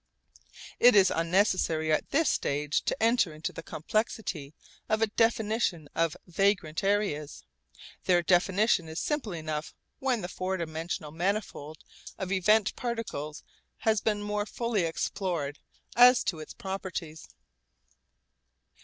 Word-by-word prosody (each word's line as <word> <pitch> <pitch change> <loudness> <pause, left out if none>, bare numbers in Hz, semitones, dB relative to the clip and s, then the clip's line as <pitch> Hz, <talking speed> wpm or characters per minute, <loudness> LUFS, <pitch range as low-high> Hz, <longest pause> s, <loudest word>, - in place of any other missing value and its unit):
It 245 -2 +7
is 195 -2 +6
unnecessary 165 -2 +2
at 155 - +1
this 315 +3 +2
stage 145 +1 0
to - - 0
enter 225 -8 +2
into 155 - -4
the - - -7
complexity 160 -4 -3 0.3
of 215 0 +2
a 225 - +4
definition 220 -7 0
of 165 -1 0
vagrant 180 -2 0
areas. 195 - -1 0.6
Their 175 -1 +4
definition 185 0 +3
is 160 +2 -4
simple 295 -8 -2
enough 155 -2 -4 0.2
when 255 -4 0
the 175 - -4
four 185 +1 -3
dimensional 160 -2 -4
manifold 170 -3 -3 0.3
of 190 -1 -4
event 205 +2 +3
particles 225 - -4 0.3
has 220 -2 +1
been 210 -1 0
more 210 0 -2
fully 230 -6 -1
explored 165 -3 -2 0.4
as 245 +2 +7
to 165 - -2
its 155 - -9
properties. 185 -5 -6
185 Hz, 125 wpm, -29 LUFS, 160-215 Hz, 0.6 s, It